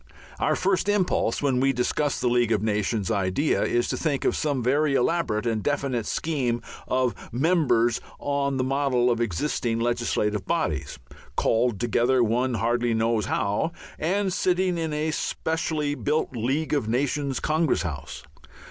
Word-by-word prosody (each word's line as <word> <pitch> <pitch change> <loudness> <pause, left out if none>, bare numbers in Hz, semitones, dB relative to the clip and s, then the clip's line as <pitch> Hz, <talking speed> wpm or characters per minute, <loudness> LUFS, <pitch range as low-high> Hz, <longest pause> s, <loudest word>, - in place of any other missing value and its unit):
Our - - +2
first 190 +1 +1
impulse, 185 - +1
when 135 -3 +2
we 135 +1 +3
discuss 135 +4 0
the - - 0
League 120 -1 +2
of 105 -2 +1
Nations 105 -2 0
idea, 100 +10 +1
is 120 0 +1
to - - -1
think 145 -4 -1
of - - +2
some 145 -5 -1
very 140 +3 +2
elaborate 125 -6 +1
and 115 -2 0
definite 135 -4 -1
scheme 125 -7 -1 0.2
of 130 -1 +1 0.2
members 125 -5 +2 0.2
on 140 -1 -1
the 130 - +1
model 130 -2 +2
of 120 0 0
existing 115 - -1
legislative 115 -3 0
bodies, 80 - -1 0.4
called 115 -2 +1
together 120 +2 +2
one 120 +3 +1
hardly 120 +2 +1
knows 110 -2 +1
how, 105 +12 0 0.3
and 190 +4 0
sitting 180 0 +1
in 165 -2 -2
a 155 +1 -1
specially 155 -2 -1
built 145 -2 -1
League 135 +8 -1
of 140 -7 0
Nations 140 +2 0
Congress 155 - +1
House. 70 -5 -6
130 Hz, 150 wpm, -25 LUFS, 115-150 Hz, 0.4 s, we